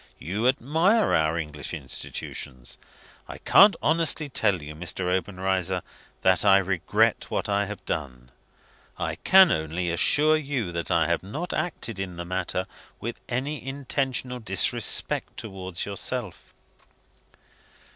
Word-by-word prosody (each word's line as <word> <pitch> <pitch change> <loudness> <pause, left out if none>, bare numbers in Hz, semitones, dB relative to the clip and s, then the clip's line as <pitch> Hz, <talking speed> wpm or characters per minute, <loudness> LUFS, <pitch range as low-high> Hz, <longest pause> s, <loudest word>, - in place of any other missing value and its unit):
"You 100 +9 -1
admire 160 - +2
our 80 +1 +2
English 75 0 -4
institutions. 65 -2 -6 0.5
I - - -8
can't 200 0 +6
honestly 160 -1 +2
tell 105 -8 +1
you, 75 0 -8
Mr. 85 +4 -4
Obenreizer, 95 -1 -1 0.4
that 95 -1 +3
I 100 -1 +6
regret 95 -2 +1
what - - -2
I 100 0 +1
have 105 -1 -8
done. 65 -4 -5 0.7
I - - -3
can 190 -1 +6
only 80 +3 -1
assure 150 - +4
you 135 - -3
that 85 -1 -4
I 80 -2 +3
have 85 +1 0
not 150 - -5
acted 115 - -3
in 90 -3 -5
the 85 - -5
matter 95 +1 -2 0.3
with 120 +1 -5
any 135 +4 -3
intentional 135 -2 -2
disrespect 95 -5 0
towards 95 -5 -5
yourself. 100 0 -3
95 Hz, 125 wpm, -26 LUFS, 85-130 Hz, 0.7 s, can't